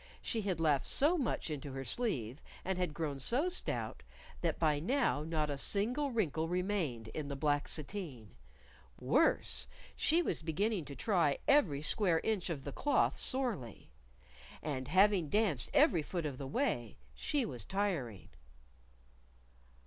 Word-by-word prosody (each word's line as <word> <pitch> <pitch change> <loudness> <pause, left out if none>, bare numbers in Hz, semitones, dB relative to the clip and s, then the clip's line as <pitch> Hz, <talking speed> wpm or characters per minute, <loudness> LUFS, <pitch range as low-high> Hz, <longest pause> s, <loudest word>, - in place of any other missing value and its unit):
She 225 - -2
had 190 -5 -1
laughed 150 -4 +2
so 300 +6 +3
much 260 - -1
into 140 -2 -5
her 135 0 -5
sleeve, 135 - -1 0.2
and 190 0 -1
had 180 -3 0
grown 150 -3 -3
so 265 - +1
stout, 365 - -3 0.4
that - - 0
by 150 -3 +2
now 240 - +1
not 155 -1 -1
a 140 - -3
single 245 - 0
wrinkle 165 - 0
remained 175 - -1
in 150 +4 -5
the 140 - -4
black 145 +1 +1
sateen; 150 - -4 0.7
worse 220 - +2 0.3
she 340 +3 +3
was - - -1
beginning 175 +3 -1
to 140 - -8
try 165 - +2
every 170 - +4
square 175 -1 +2
inch 210 -5 -1
of 145 -5 -4
the 140 - -5
cloth 290 -3 +2
sorely. 225 - -3 0.7
And 130 -4 -3
having 185 -2 +4
danced 200 - +2
every 165 - +5
foot 170 +2 -3
of 140 -4 -4
the 135 - -4
way, 135 - -1 0.2
she 275 - 0
was 125 - -4
tiring. 170 - -2
165 Hz, 150 wpm, -34 LUFS, 140-210 Hz, 0.7 s, every